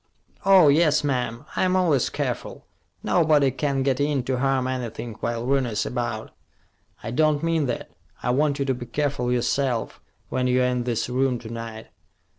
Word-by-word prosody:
"Oh, 190 -5 +7
yes, 150 0 +4
ma'am. 125 -2 -2
I'm 185 0 +2
always 165 -9 +2
careful. - - -4 0.4
Nobody 150 -5 +3
can 135 0 -1
get 135 -1 +1
in 145 -2 +1
to 130 0 -1
harm 135 -1 +1
anything 120 -2 -4
while 115 0 -2
Rooney's 125 -6 0
about." 120 -3 -3 0.7
"I 110 - -4
don't 155 +3 +2
mean 165 -3 +1
that. - - -4 0.3
I 125 - +1
want 140 +2 +1
you 140 - -1
to 135 - +1
be 120 -1 -7
careful 140 -1 -1
yourself, 125 -1 -1 0.3
when 125 -1 0
you're 125 0 +3
in 125 -1 0
this 120 -3 -1
room 130 0 +1
to 115 -1 -10
night." 115 -1 -7
130 Hz, 165 wpm, -24 LUFS, 120-145 Hz, 0.7 s, Oh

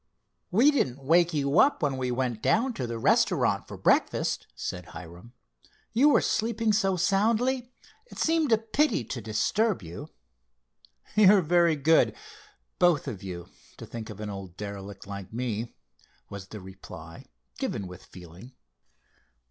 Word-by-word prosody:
"We 240 +11 +5
didn't 135 - -1
wake 170 +4 +4
you 145 +2 +1
up 280 - +4
when 140 -2 +1
we 130 -1 -2
went 125 -3 -2
down 240 - +2
to 130 - -4
the 115 0 -4
restaurant 115 - +2
for - - -8
breakfast," - - +1
said 90 +7 -5
Hiram. 90 +7 -11 0.6
"You 265 +6 +5
were - - +4
sleeping 225 -1 0
so 195 -2 +2
soundly 235 +7 +1 0.4
it - - -13
seemed 320 -4 +1
a 225 - +6
pity 225 - +1
to 120 +2 -6
disturb 165 - 0
you." 85 +1 -8 1.1
"You're 200 -2 +6
very 170 0 +3
good, 155 +3 +3 0.6
both 175 -5 +3
of 110 -8 -5
you, 90 -3 -7 0.3
to - - -9
think 115 -2 -8
of 105 -1 -9
an 105 -1 -5
old 95 -3 -9
derelict 100 -1 -7
like 100 -2 -8
me," 115 -1 -3 0.6
was 100 -1 -8
the 105 0 -9
reply, 95 -3 -11 0.3
given 100 - -3
with 90 0 -10
feeling. 90 +8 -13
130 Hz, 150 wpm, -27 LUFS, -, 1.1 s, a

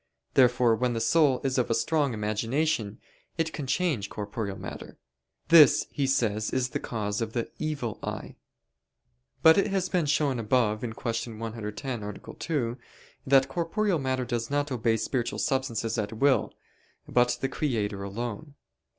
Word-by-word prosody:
Therefore 125 -2 +4
when 125 +1 0
the 115 - -1
soul 135 +3 +3
is 135 -1 +1
of 125 - 0
strong 145 +3 +1
imagination, 110 +2 -1 0.4
it 165 -1 -1
can 145 -3 -5
change 140 - 0
corporeal 105 -1 -4
matter. - - -8 0.5
This 155 -3 +7
he 140 -2 -1
says 110 -5 +1
is 130 -1 0
the - - -3
cause 105 -2 -3
of 115 -1 -3
the 120 -2 -2
"evil 140 -8 -3
eye." - - -6 1.1
But 160 +3 +8
it 195 - +2
has 190 -2 -1
been 175 -4 +1
shown 145 -3 +1
above 110 -1 +1
(Q. 115 0 -4
110, 115 +2 -5
A. 105 0 -8
2) 125 -7 -2 0.5
that 135 0 +5
corporeal 170 +5 0
matter 130 -2 -1
does 120 -1 -2
not 145 0 -1
obey 115 -2 +1
spiritual 120 +1 -2
substances 120 -5 -1
at 105 0 -3
will, 135 +4 +2 0.6
but 125 0 +2
the 135 - 0
Creator 110 -8 -2
alone. 120 +8 -5
125 Hz, 150 wpm, -27 LUFS, 110-145 Hz, 1.1 s, But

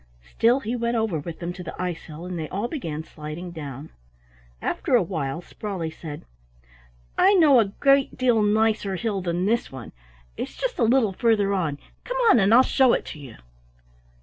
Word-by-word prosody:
Still 240 +4 +3
he 235 +1 -3
went 235 0 -1
over 220 -8 0
with 165 +3 -7
them 175 0 -5
to 180 - -9
the 170 - -7
icehill 170 -2 -5
and 180 -2 -5
they 155 -2 -5
all 205 +5 -2
began 165 - -5
sliding 155 +3 -8
down. 145 -2 -8 0.7
After 250 - 0
a 235 - +4
while 165 -2 -4
Sprawley 185 -7 -5
said: 155 -2 -9 0.9
"I 395 +2 +6
know 300 -8 +6
a 225 - +4
great 275 +7 +2
deal 245 -3 +3
nicer 210 -1 +1
hill 200 0 -2
than 175 0 -1
this 230 +3 0
one. 130 -4 -9 0.5
It's - - -6
just - - -3
a - - +3
little 230 -3 +3
farther 205 -2 +2
on; 160 -7 -1 0.3
come - - -4
on 240 - +5
and 195 +1 +3
I'll 245 +3 +8
show 260 -2 +3
it - - -1
to 155 - -12
you." 135 -5 -11
195 Hz, 185 wpm, -24 LUFS, 165-235 Hz, 0.9 s, I'll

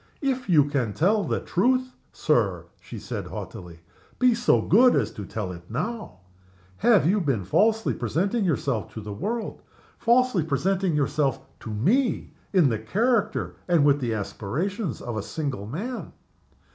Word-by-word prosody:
"If 260 -5 -1
you 150 -5 +5
can 135 -7 -1
tell 200 - +2
the - - -1
truth, 255 +7 +1 0.2
Sir," 100 - 0
she - - -10
said, - - -5
haughtily, 85 -2 -8 0.4
"be 250 -1 +4
so 230 - +3
good 240 - +5
as 110 -6 +1
to 100 - -8
tell 105 -5 -4
it 85 -1 -11
now. 160 - -4 0.6
Have 230 -8 +4
you 200 +3 +2
been 135 - 0
falsely 220 - +2
presenting 190 - -1
yourself 140 - -1
to 110 - -5
the 105 0 -6
world 220 - -4 0.4
falsely 240 -4 +3
presenting 175 +4 0
yourself 140 -1 +1 0.2
to - - -8
me 195 - 0 0.2
in 180 -8 +4
the 110 -3 -1
character 215 - 0
and 170 -5 +4
with 145 0 +4
the 120 -4 -1
aspirations 135 - -3
of 120 -2 -4
a - - -1
single 130 -4 -4
man? 215 - -5
155 Hz, 155 wpm, -25 LUFS, -, 0.6 s, you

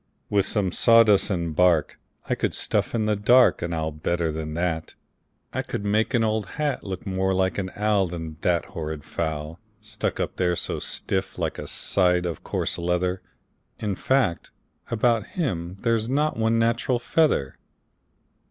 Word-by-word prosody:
"With 100 -2 +2
some 100 -4 0
sawdust 115 -2 +5
and 85 -5 -2
bark 85 -4 +3 0.3
I - - +1
could - - -1
stuff - - 0
in 110 -2 +1
the 105 0 +2
dark 120 +5 +5
An 85 - -3
owl 80 -1 -2
better 80 +2 -1
than 75 0 -5
that. 85 -2 -2 0.6
I - - 0
could 100 - -5
make 110 +5 +1
an 115 - +3
old 110 -2 0
hat 150 -2 -1
Look 95 -1 -6
more 95 -1 0
like 95 +1 +1
an 95 -1 -3
owl 105 -2 +2
Than 80 -2 -6
that 85 -2 +1
horrid 80 -6 -6
fowl, 80 0 -4 0.2
Stuck 105 -1 -4
up - - -3
there 90 -1 +1
so - - -3
stiff - - -2
like - - -2
a - - -6
side 90 -2 +1
of 85 -4 -4
coarse - - -2
leather. 90 +2 0 0.6
In 105 -2 -2
fact, 115 -6 0 0.4
about 115 -1 +1
him 90 - -2
there's 115 -1 +1
not 150 +3 +1
one 115 0 +1
natural 115 +2 +1
feather." 125 - +1
95 Hz, 165 wpm, -25 LUFS, 85-110 Hz, 0.6 s, sawdust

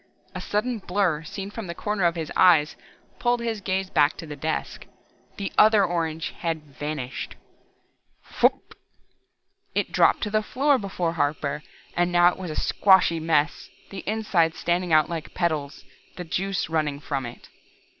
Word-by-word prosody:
A - - -5
sudden 225 +3 -1
blur 180 -5 0
seen 195 +5 -7
from 220 -2 -6
the 170 - -5
corner 210 -2 -1
of 170 0 +2
his 160 -2 -4
eyes 160 -5 +5 0.4
pulled 240 0 +1
his 230 -3 -3
gaze 190 0 -2
back 145 +1 +3
to - - -7
the 150 -2 -7
desk. 155 +2 -4 0.5
The 200 -1 -4
other 215 -2 +6
orange 165 -2 -2
had 165 -5 -2
vanished. 145 -2 -5 1.0
Phwup! - - +2 1.0
It - - 0
dropped - - +4
to 210 - -2
the 215 0 +2
floor 270 +5 +2
before 180 -4 -2
Harper, 150 -2 -1 0.3
but 175 0 +2
now 175 0 +5
it - - -12
was 185 -3 -5
a 155 - -5
squashy 190 -4 +4
mess, 155 -1 0 0.2
the 195 - -7
insides 195 -7 +1
standing 175 0 0
out 155 -1 +5
like 165 -3 -6
petals, 155 -5 -2 0.3
the 180 - -6
juice 190 +3 -2
running 155 -3 -1
from 135 -4 -3
it. 120 - -12
175 Hz, 160 wpm, -25 LUFS, 155-195 Hz, 1.0 s, other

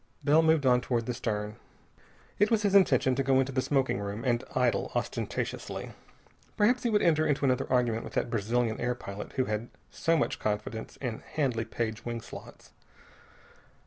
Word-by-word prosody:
Bell 155 +2 +5
moved 160 -3 +3
on 125 -1 +5
toward 120 -2 -1
the 125 - -2
stern. 105 -3 -3 0.8
It 205 +1 +4
was 220 -2 +2
his 200 -2 +2
intention 135 -10 +5
to 130 - 0
go 135 -1 +3
into 135 +1 0
the 130 0 0
smoking 135 -6 +1
room 100 +2 -5
and 120 -1 +1
idle 125 -2 +1
ostentatiously. - - -3 0.7
Perhaps 245 +4 +3
he 240 - 0
would 210 -2 +2
enter 155 -2 +3
into 145 -1 +1
another 130 -1 +1
argument 120 -3 +2
with - - -9
that - - -1
Brazilian 115 +1 0
air 125 +1 0
pilot 100 -3 -8
who 130 -2 +1
had 110 +2 -3 0.2
so 165 0 +1
much - - -1
confidence 110 +1 -3
in 120 -4 -3
Handley 125 -7 -1
Page 110 -1 -3
wing 120 -1 -3
slots. - - -12
125 Hz, 175 wpm, -29 LUFS, 115-145 Hz, 0.8 s, Bell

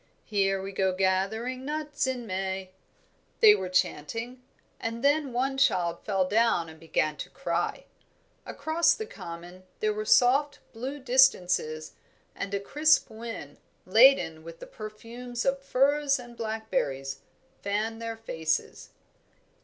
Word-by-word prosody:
"Here 195 -2 +1
we 195 - -5
go 190 -1 +1
gathering 195 +7 0
nuts 295 -1 -2
in 250 -2 -3
May," 190 -1 -3 0.7
they 435 -2 +9
were 185 - -2
chanting, 225 +8 -1 0.4
and 230 +2 -4
then 285 -1 +2
one 265 +3 -1
child 175 -10 +2
fell 195 -3 0
down 205 -5 +2
and 160 0 -13
began 155 -2 -1
to - - -6
cry. 275 - -2 0.6
Across 315 +4 +1
the 440 - -5
common 175 - -9 0.2
there 215 0 +1
were 215 +1 -3
soft 280 +6 +4 0.2
blue 260 +5 -5
distances 185 - +2 0.4
and 200 - -5
a - - 0
crisp 300 +9 +3
wind, 220 -10 -8 0.3
laden 190 -7 +5
with 165 0 -10
the - - -8
perfumes 235 +3 -7
of 270 0 +1
firs 275 +1 +2
and 240 -1 -11
blackberries, 215 -13 -3 0.4
fanned 215 +3 -2
their 230 -1 -4
faces. 160 -8 -3
225 Hz, 130 wpm, -28 LUFS, 185-265 Hz, 0.7 s, they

